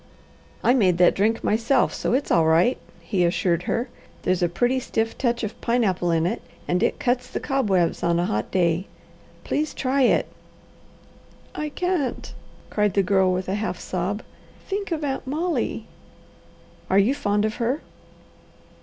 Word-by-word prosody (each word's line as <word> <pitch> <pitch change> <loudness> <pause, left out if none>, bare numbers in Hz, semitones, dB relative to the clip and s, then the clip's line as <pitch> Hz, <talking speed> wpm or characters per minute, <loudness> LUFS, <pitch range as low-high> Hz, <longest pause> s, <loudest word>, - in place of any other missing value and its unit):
"I 245 - +5
made 190 -9 +3
that 175 0 +5
drink 220 +3 +1
myself, 230 +4 +2
so - - -1
it's 270 +3 0
all 165 -2 +4
right," 170 +10 +3 0.2
he 190 -5 0
assured 175 0 +1
her. 240 +3 0 0.4
"There's 185 0 +1
a 175 - +2
pretty 245 +9 +1
stiff 225 -2 -2
touch 240 -2 -1
of 215 - -5
pineapple 205 -7 +1
in 165 -1 +2
it, 175 - -1 0.3
and 180 +1 +1
it - - +1
cuts 250 0 0
the - - -3
cobwebs 200 - +1
on 170 0 +2
a 175 - +1
hot 105 -8 -2
day. 175 0 +1 0.6
Please 305 +1 -2
try 270 +1 0
it!" 250 - +4 1.3
"I 305 0 -3
can't!" 355 -4 -2 0.4
cried 210 -2 +1
the 200 - +4
Girl 190 0 +3
with 185 0 -2
a 190 - -1
half 205 -3 -2
sob. 185 +4 -3 0.4
"Think 400 -1 -3
of 315 -2 -2
Aunt 270 -1 -3
Molly!" 330 +5 -1 1.0
"Are 190 - +3
you 205 +7 +4
fond 205 -5 0
of 215 - -2
her?" 250 +5 -1
215 Hz, 165 wpm, -24 LUFS, 180-260 Hz, 1.3 s, I